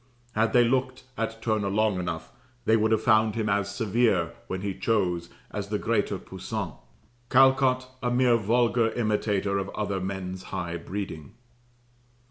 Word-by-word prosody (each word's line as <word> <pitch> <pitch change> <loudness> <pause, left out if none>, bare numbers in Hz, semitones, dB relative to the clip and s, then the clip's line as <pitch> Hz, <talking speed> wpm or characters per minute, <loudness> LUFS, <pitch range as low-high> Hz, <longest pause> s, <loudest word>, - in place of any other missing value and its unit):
Had 110 +1 +2
they 120 - +6
looked 130 +1 0
at 115 -1 -4
Turner 110 -3 0
long 105 -1 +1
enough 85 -2 -4 0.3
they 110 - +5
would 110 0 +2
have 110 0 +2
found 110 -1 +4
him 110 -2 -1
as 100 -1 +1
severe, 100 -6 +1
when 95 0 -4
he 100 -1 -2
chose, 90 -6 0 0.2
as - - -4
the - - 0
greater - - 0
Poussin; - - -5 0.6
Callcott, 130 0 +4 0.2
a 125 - 0
mere 120 -1 +4
vulgar 115 +1 +2
imitator 105 -3 0
of 95 0 -4
other 100 -2 -1
men's 95 -1 -4
high 90 -3 -4
breeding. 85 -4 -6
110 Hz, 150 wpm, -27 LUFS, 95-115 Hz, 0.6 s, they